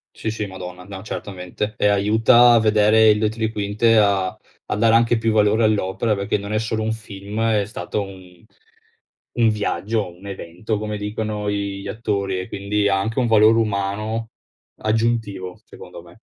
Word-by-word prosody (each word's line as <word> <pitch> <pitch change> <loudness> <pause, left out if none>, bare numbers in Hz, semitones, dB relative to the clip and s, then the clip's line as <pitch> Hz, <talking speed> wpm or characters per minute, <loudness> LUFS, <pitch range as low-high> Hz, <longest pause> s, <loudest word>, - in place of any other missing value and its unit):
Sì, - - -4
sì, 110 -1 -3
madonna! 90 -2 -8
No 95 0 -9
certamente, 100 0 -5
e 105 - +1
aiuta 110 +4 +5
a 115 - +6
vedere 110 0 +4
il 105 - +4
dietro 110 +1 -1
li - - -6
quinte, 105 +2 +2
a 100 -3 +3 0.4
a - - -1
dare 115 +1 +3
anche 115 0 +3
più 115 0 0
valore 105 +1 +3
all'opera 105 +1 0
perché 100 +1 -1
non 100 +1 -6
è 110 - +1
solo 110 0 -2
un 110 0 -1
film: 105 -1 -7
è 110 -3 +2
stato 100 0 -4
un 95 -2 -13 0.9
un 115 -2 +3
viaggio 105 +1 -1
o 90 -4 -8
un 95 +3 -13
evento, 100 +3 -4
come 105 0 -4
dicono 105 0 -4
i 100 -1 -3
gli - - -8
attori, 100 -4 -2
e 95 - -8
quindi 100 +1 -1
ha 95 -1 +2
anche 110 +3 -3
un 125 - +2
valore 110 0 +5
umano 105 +1 -2 0.5
aggiuntivo, 110 -5 -1
secondo - - -12
me. - - -18
105 Hz, 180 wpm, -21 LUFS, 100-110 Hz, 0.9 s, a